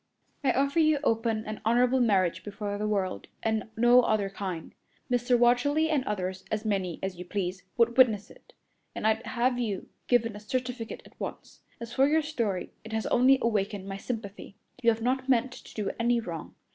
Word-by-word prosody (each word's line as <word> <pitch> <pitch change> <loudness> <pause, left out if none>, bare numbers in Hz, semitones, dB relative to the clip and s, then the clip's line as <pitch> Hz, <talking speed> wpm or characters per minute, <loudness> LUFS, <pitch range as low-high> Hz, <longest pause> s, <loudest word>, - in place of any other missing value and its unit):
"I 265 - +4
offer 280 +5 +1
you 310 -1 +4
open 225 -3 +1
and 215 0 -6
honorable 245 +3 +3
marriage 195 -7 +2
before 205 0 -4
the 210 - -1
world, 195 -3 -1 0.2
and 220 0 -1
no 240 +2 +6
other 210 -4 0
kind. 185 -5 -5 0.4
Mr. 245 0 +3
Watterly 285 +7 +3
and 290 -4 +2
others 190 -2 -3
as 215 +1 -2
many 190 -5 -1
as 190 -2 -3
you - - -4
pleased 185 0 -3 0.2
would 235 +1 +3
witness 215 -5 +4
it, - - -19 0.4
and - - -4
I'd 220 +1 +2
have 245 0 +1
you 210 -6 -3 0.2
given 230 -3 +2
a - - -7
certificate 245 +1 -4
at - - -19
once. - - -7 0.2
As 235 0 -7
for 270 +1 +4
your 315 +2 +3
story, 230 - -2
it 220 0 -9
has 220 0 -1
only 260 +2 +5
awakened 205 -3 -1
my 195 0 -4
sympathy. 200 -2 -6 0.3
You 235 - +5
have 225 0 0
not 260 +2 0
meant 250 0 +3
to - - -12
do 210 -2 -1
any 235 +1 +3
wrong. 170 -8 -7
225 Hz, 190 wpm, -28 LUFS, 205-250 Hz, 0.4 s, no